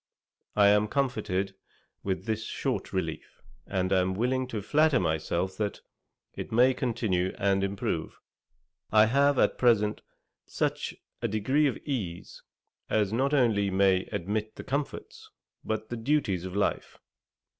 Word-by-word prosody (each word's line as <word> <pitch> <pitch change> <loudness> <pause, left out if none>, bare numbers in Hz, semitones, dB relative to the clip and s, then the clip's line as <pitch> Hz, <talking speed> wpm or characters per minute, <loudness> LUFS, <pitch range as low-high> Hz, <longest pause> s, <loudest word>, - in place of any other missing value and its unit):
I 100 -1 +6
am 105 +1 +4
much - - -8
comforted 105 -8 -1 0.5
with 95 -1 -3
this 110 -1 -2
short - - -3
relief, - - -4 0.3
and 95 -1 0
am 95 0 +2
willing 130 +4 0
to 110 -5 -4
flatter 150 +3 +3
myself 85 +2 -1
that 105 -2 -2 0.5
it - - -7
may 125 +3 +5
continue 110 -8 -1
and 100 -1 +2
improve. 100 0 -3 0.7
I 110 0 +7
have 140 +4 +3
at - - +2
present, 105 -4 +3 0.4
such - - -2 0.3
a - - +1
degree 130 +9 +2
of 135 - -2
ease, 100 - -4 0.5
as 105 -1 +1
not 135 +5 +2
only 110 -7 +3
may 95 -1 +3
admit 105 +3 -3
the - - -8
comforts, 140 +2 -4 0.3
but 110 0 -3
the 120 - -4
duties 115 - 0
of 95 0 -6
life. 100 - -1
105 Hz, 140 wpm, -28 LUFS, 95-125 Hz, 0.7 s, I